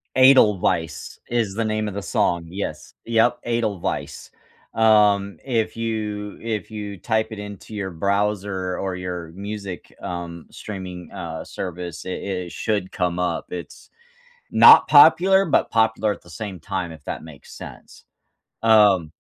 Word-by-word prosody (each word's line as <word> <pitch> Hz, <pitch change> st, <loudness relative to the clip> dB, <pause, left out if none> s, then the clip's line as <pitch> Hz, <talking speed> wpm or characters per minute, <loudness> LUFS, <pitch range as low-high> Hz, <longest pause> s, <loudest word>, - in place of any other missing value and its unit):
Edelweiss 105 Hz, -, +3 dB
is 115 Hz, -5 st, 0 dB
the 115 Hz, +1 st, -1 dB
name 110 Hz, 0 st, -1 dB
of 105 Hz, -, -5 dB
the 100 Hz, -, -4 dB
song, 85 Hz, -3 st, 0 dB
yes, 85 Hz, -5 st, -6 dB
yep, 115 Hz, +1 st, +2 dB
Edelweiss. 115 Hz, -6 st, -3 dB, 0.4 s
Um, 105 Hz, -4 st, +3 dB
if 115 Hz, -4 st, -1 dB
you 105 Hz, -2 st, -3 dB
if 110 Hz, -1 st, -4 dB
you 105 Hz, -2 st, -6 dB
type 110 Hz, +3 st, 0 dB
it 110 Hz, -, -7 dB
into 105 Hz, +1 st, -9 dB
your 100 Hz, -2 st, -4 dB
browser 100 Hz, 0 st, -1 dB
or 95 Hz, -1 st, -3 dB
your 90 Hz, -3 st, -5 dB
music, 100 Hz, -1 st, -7 dB
um, 85 Hz, -1 st, -6 dB
streaming, 90 Hz, -4 st, -8 dB
uh, -, -, -6 dB
service, 90 Hz, -2 st, -6 dB
it 95 Hz, -, -4 dB
it 90 Hz, -3 st, -4 dB
should 100 Hz, -4 st, -2 dB
come 90 Hz, -1 st, -1 dB
up. 90 Hz, -, -2 dB
It's 90 Hz, -1 st, -8 dB, 0.6 s
not -, -, +8 dB
popular, 190 Hz, +2 st, +7 dB
but 160 Hz, -, +1 dB
popular 110 Hz, -1 st, +2 dB
at -, -, -6 dB
the 85 Hz, -, -18 dB
same 95 Hz, 0 st, -7 dB
time, 95 Hz, -1 st, -4 dB
if 80 Hz, -3 st, -13 dB
that -, -, -5 dB
makes 80 Hz, -4 st, -13 dB
sense, -, -, -12 dB, 0.6 s
um. 105 Hz, -7 st, +5 dB
100 Hz, 145 wpm, -22 LUFS, 90-110 Hz, 0.6 s, not